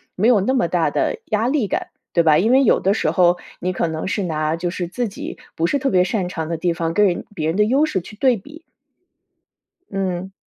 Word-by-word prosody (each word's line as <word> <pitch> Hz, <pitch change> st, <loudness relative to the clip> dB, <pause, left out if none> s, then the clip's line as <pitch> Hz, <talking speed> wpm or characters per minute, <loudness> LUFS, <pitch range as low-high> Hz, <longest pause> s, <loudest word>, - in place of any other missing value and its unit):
没 210 Hz, +5 st, +2 dB
有 235 Hz, -5 st, +5 dB
那 260 Hz, +7 st, +1 dB
么 250 Hz, -, +2 dB
大 -, -, +1 dB
的 -, -, -1 dB
压 220 Hz, +2 st, 0 dB
力 270 Hz, -6 st, +1 dB
感， -, -, -2 dB, 0.3 s
对 170 Hz, -, +4 dB
吧？ 155 Hz, -2 st, +5 dB
因 220 Hz, +8 st, +2 dB
为 270 Hz, +1 st, +5 dB
有 245 Hz, -, +4 dB
的 195 Hz, -, +2 dB
时 220 Hz, -, 0 dB
候， 175 Hz, -1 st, +3 dB, 0.2 s
你 185 Hz, +1 st, -2 dB
可 170 Hz, -, -1 dB
能 160 Hz, +2 st, -4 dB
是 190 Hz, +2 st, -1 dB
拿 155 Hz, -2 st, -1 dB
就 175 Hz, +1 st, -3 dB
是 175 Hz, 0 st, -4 dB
自 235 Hz, +6 st, -3 dB
己 195 Hz, -, -7 dB, 0.2 s
不 165 Hz, -, 0 dB
是 285 Hz, -, 0 dB
特 270 Hz, -, 0 dB
别 180 Hz, -2 st, +3 dB
擅 185 Hz, -2 st, -1 dB
长 160 Hz, -3 st, -4 dB
的 165 Hz, -, -2 dB
地 175 Hz, +2 st, 0 dB
方 165 Hz, -1 st, -2 dB
跟 210 Hz, +4 st, +4 dB
人 180 Hz, -3 st, 0 dB
别 155 Hz, -3 st, -2 dB
人 165 Hz, +4 st, -1 dB
的 210 Hz, -, +4 dB
优 270 Hz, +7 st, +3 dB
势 220 Hz, -11 st, -1 dB
去 185 Hz, +4 st, -11 dB
对 250 Hz, +2 st, +2 dB
比。 300 Hz, -, -13 dB, 1.3 s
嗯。 190 Hz, -1 st, -3 dB
190 Hz, 265 characters per minute, -20 LUFS, 170-225 Hz, 1.3 s, 有